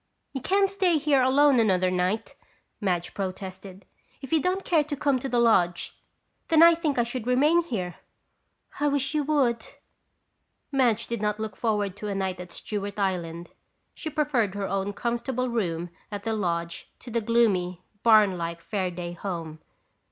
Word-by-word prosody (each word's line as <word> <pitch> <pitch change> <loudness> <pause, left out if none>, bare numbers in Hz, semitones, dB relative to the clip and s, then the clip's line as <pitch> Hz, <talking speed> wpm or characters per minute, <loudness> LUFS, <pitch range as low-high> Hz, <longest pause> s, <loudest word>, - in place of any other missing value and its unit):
"You 270 - -4
can't 390 +7 +3
stay 380 -4 +2
here 290 -3 +3
alone 270 +1 +5
another 185 -4 +2
night," 185 +4 -1 0.5
Madge 180 -4 -1
protested. 190 0 -6 0.3
"If 270 +2 -7
you 320 - +4
don't 370 +3 -1
care 320 -4 +3
to 290 0 -4
come 275 -2 +1
to 270 - -4
the 245 - 0
lodge, 180 -7 +2 0.5
then 325 -1 +6
I 335 0 +9
think 320 -5 -1
I 240 - +4
should 240 0 -5
remain 295 +7 +4
here." 185 - -4 0.8
"I 295 - +2
wish 280 0 0
you 300 -1 +1
would!" 255 -7 +1 1.1
Madge 240 -5 +2
did 235 -2 -4
not 210 0 0
look 215 -1 -4
forward 210 -4 -1
to 210 - -5
a 200 - -2
night 190 -1 -2
at 180 -1 -8
Stewart 205 +1 -5
Island. 175 -4 -2 0.4
She 315 - -5
preferred 270 -10 0
her 200 -1 -2
own 195 +1 -1
comfortable 240 +3 -2
room 175 -7 -2 0.2
at 205 -1 -5
the 225 - -1
lodge 170 -4 -2
to 240 - -11
the 235 0 0
gloomy, 200 -6 +1 0.2
barn 215 -5 +5
like 170 0 -4
Fairaday 180 -4 -3
home. 165 -4 -5
220 Hz, 165 wpm, -26 LUFS, 185-270 Hz, 1.1 s, I